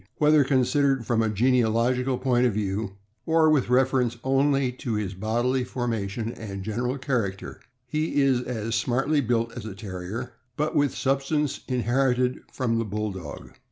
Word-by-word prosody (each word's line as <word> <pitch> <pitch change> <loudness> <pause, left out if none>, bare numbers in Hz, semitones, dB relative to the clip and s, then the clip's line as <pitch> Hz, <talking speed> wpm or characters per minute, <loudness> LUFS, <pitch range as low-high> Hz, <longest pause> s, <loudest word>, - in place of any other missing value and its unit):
Whether 150 -1 +5
considered 135 -1 +2
from 115 -1 +1
a 110 - +1
genealogical 125 +3 +2
point 125 -1 +2
of 115 - -1
view, 100 -1 -2 0.3
or 160 -1 +4
with 140 -5 +2
reference 125 -2 +2
only 135 0 +2
to 125 -2 -4
his 105 -3 -2
bodily 120 +6 0
formation 115 -3 -3
and 100 -5 -7
general 120 +5 -2
Character, 120 -8 -3 0.3
he 155 +3 -1
is 135 -3 +3
as 115 -3 -4
smartly 135 +6 +1
built 115 -2 0
as 120 - -6
a 100 - -7
Terrier, 100 +4 -6 0.2
but 150 +1 -1
with 145 -1 +2
substance 140 +2 0
inherited 125 0 +1
from 115 -3 0
the - - +1
Bulldog. 100 -6 -5
125 Hz, 150 wpm, -25 LUFS, 110-135 Hz, 0.3 s, Whether